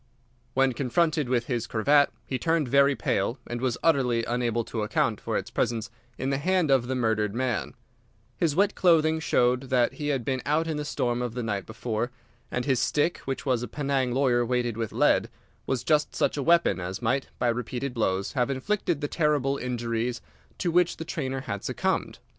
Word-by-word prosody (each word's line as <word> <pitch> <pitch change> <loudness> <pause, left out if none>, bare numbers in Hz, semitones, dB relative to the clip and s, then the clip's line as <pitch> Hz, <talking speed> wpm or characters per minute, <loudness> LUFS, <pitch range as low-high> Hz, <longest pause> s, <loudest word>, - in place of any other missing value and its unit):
When 135 -1 +3
confronted 150 +2 +1
with 120 -2 +1
his 120 -2 -2
cravat, 140 +6 +4 0.2
he 130 - -3
turned 165 -4 +1
very 140 +2 +4
pale, 115 +3 -1
and 120 0 -5
was 130 -3 0
utterly 125 -7 +2
unable 120 -1 0
to 110 - -4
account 105 0 0
for - - -1
its - - -5
presence 115 0 -1 0.3
in 130 +1 -2
the 135 - 0
hand 180 -1 +2
of 130 -3 +3
the 130 - -1
murdered 110 -4 0
man. 120 - -1 0.6
His 160 -4 0
wet 200 +3 +3
clothing 160 -3 +3
showed 125 -3 +1
that 125 -2 +2
he 150 - -4
had 135 -5 -1
been 130 -2 -1
out 150 +3 +1
in 160 -2 -2
the 150 - -3
storm 120 -4 -1
of 120 -1 -3
the 125 - -2
night 105 -3 -3
before, 115 +1 -3 0.4
and 125 - -2
his 130 -4 +2
stick, 150 +4 +1
which 135 +1 -4
was 125 -4 +1
a 125 - -4
Penang 135 0 -1
lawyer 125 -2 +2
weighted 120 -1 0
with 115 -1 -3
lead, - - +3 0.4
was 130 -2 -1
just 150 +2 +1
such - - +1
a 145 - -2
weapon 170 - +3
as 90 +2 -4
might, 130 +3 0
by 125 - 0
repeated 125 +3 -3
blows, 100 -4 0
have 125 -2 0
inflicted 165 +3 -1
the 145 - -1
terrible 145 -4 +1
injuries 120 -1 -2 0.4
to 175 - -1
which 175 0 +2
the 165 - -6
trainer 135 -5 -3
had 100 -6 -5
succumbed. - - -1
130 Hz, 195 wpm, -27 LUFS, 120-145 Hz, 0.6 s, cravat